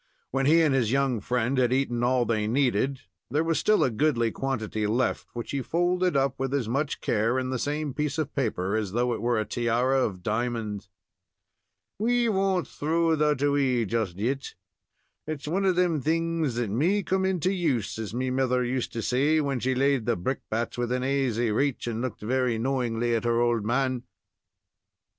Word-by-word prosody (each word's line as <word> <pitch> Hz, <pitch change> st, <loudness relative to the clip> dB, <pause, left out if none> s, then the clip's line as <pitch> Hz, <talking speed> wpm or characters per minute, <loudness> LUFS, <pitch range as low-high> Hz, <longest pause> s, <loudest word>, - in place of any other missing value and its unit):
When 135 Hz, +1 st, +1 dB
he 165 Hz, +2 st, +5 dB
and 150 Hz, -4 st, +3 dB
his 120 Hz, -5 st, +1 dB
young 135 Hz, -3 st, +1 dB
friend 125 Hz, +4 st, 0 dB
had 125 Hz, -1 st, +2 dB
eaten 125 Hz, -2 st, 0 dB
all 125 Hz, 0 st, +2 dB
they 110 Hz, -2 st, 0 dB
needed, 130 Hz, +1 st, +1 dB, 0.3 s
there 150 Hz, +5 st, +1 dB
was 165 Hz, -1 st, +1 dB
still 215 Hz, 0 st, +3 dB
a 130 Hz, -, +1 dB
goodly 120 Hz, -2 st, +1 dB
quantity 110 Hz, -5 st, -2 dB
left, 120 Hz, +3 st, 0 dB
which 120 Hz, -1 st, -5 dB
he 140 Hz, -, -1 dB
folded 175 Hz, +2 st, +1 dB
up 135 Hz, -1 st, 0 dB
with 135 Hz, +1 st, -1 dB
as 130 Hz, -6 st, -1 dB
much 140 Hz, +5 st, -1 dB
care 115 Hz, +3 st, +1 dB
in 130 Hz, 0 st, -2 dB
the 130 Hz, -, -2 dB
same 150 Hz, +1 st, -2 dB
piece 150 Hz, +1 st, -2 dB
of 155 Hz, -3 st, -2 dB
paper 105 Hz, -7 st, -1 dB
as 105 Hz, -3 st, -2 dB
though 120 Hz, +1 st, +1 dB
it -, -, -4 dB
were 120 Hz, -1 st, +1 dB
a 110 Hz, -, -1 dB
tiara 120 Hz, +4 st, +1 dB
of 95 Hz, -7 st, -2 dB
diamonds. 110 Hz, -3 st, -2 dB, 1.1 s
"We 240 Hz, +2 st, +2 dB
won't 190 Hz, -3 st, +1 dB
throw 165 Hz, +2 st, +1 dB
that 150 Hz, -2 st, +1 dB
away 135 Hz, -5 st, +2 dB
just 105 Hz, -4 st, -2 dB
yet. 130 Hz, +6 st, -2 dB, 0.7 s
It's 150 Hz, -2 st, -5 dB
one 190 Hz, +5 st, 0 dB
of 185 Hz, -2 st, +3 dB
them 175 Hz, -4 st, +2 dB
things 165 Hz, -2 st, 0 dB
that 120 Hz, -4 st, -2 dB
may 175 Hz, -, +1 dB
come 190 Hz, +1 st, 0 dB
into 185 Hz, -1 st, +1 dB
use, 140 Hz, -, -1 dB
as 110 Hz, -2 st, -4 dB
me 125 Hz, +2 st, -2 dB
mither 125 Hz, -1 st, +1 dB
used 125 Hz, 0 st, -2 dB
to 115 Hz, -, -3 dB
say 145 Hz, +5 st, +2 dB
when 140 Hz, -4 st, -1 dB
she 130 Hz, +2 st, 0 dB
laid 135 Hz, -3 st, +1 dB
the 120 Hz, -, +2 dB
brickbats 115 Hz, +3 st, -3 dB
within 125 Hz, +1 st, -1 dB
aisy 130 Hz, -4 st, 0 dB
raich, 135 Hz, +4 st, 0 dB
and 115 Hz, -1 st, -3 dB
looked 130 Hz, -3 st, -4 dB
very 125 Hz, +1 st, 0 dB
knowingly 120 Hz, -1 st, 0 dB
at 115 Hz, -, 0 dB
her 120 Hz, 0 st, +2 dB
old 120 Hz, -2 st, +2 dB
man." 125 Hz, +2 st, 0 dB
130 Hz, 190 wpm, -26 LUFS, 115-145 Hz, 1.1 s, he